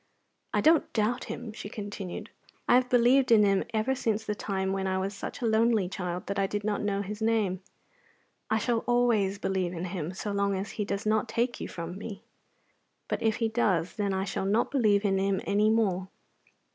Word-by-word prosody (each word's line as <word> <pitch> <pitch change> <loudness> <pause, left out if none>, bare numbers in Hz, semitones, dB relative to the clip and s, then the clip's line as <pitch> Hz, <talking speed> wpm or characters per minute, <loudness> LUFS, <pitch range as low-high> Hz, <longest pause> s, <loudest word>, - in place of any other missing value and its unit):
"I - - +1
don't 320 +1 +4
doubt 220 +2 0
Him," 235 -3 -6
she 205 - -7
continued. 205 -3 -6 0.4
"I - - +5
have 250 0 +4
believed 250 +2 +4
in 215 -2 +7
Him 195 -1 +3
ever 225 +4 +1
since 220 -4 -1
the 210 - -1
time 190 -2 -2
when 190 0 -1
I 190 0 0
was 190 +2 -2
such 200 - -7
a - - 0
lonely 220 -3 +3
child 180 -1 -4
that 200 0 -2
I 195 - +2
did 205 +1 -3
not 205 -1 -1
know 200 -1 -1
His 210 +2 -6
name. 215 -5 +1 0.9
I 220 - +2
shall 230 +1 +1
always 235 -5 +2
believe 190 -3 -1
in 175 +1 -4
Him 180 -1 -4
so 205 - -4
long 200 0 +1
as 195 +2 -4
He 210 - -3
does 200 +1 -3
not 215 +1 +1
take 240 +2 -1
you - - -3
from 175 +2 -6
me. 210 -1 -7 0.8
But - - -2
if 220 -1 +2
He 230 - 0
does, 200 -7 +1
then 205 -2 -1
I 190 0 0
shall 190 0 -3
not 210 +4 +1
believe 215 -7 +3
in 195 -1 +2
Him 195 0 +1
any 210 +2 +3
more. 190 -4 +1
205 Hz, 210 wpm, -28 LUFS, 195-225 Hz, 0.9 s, in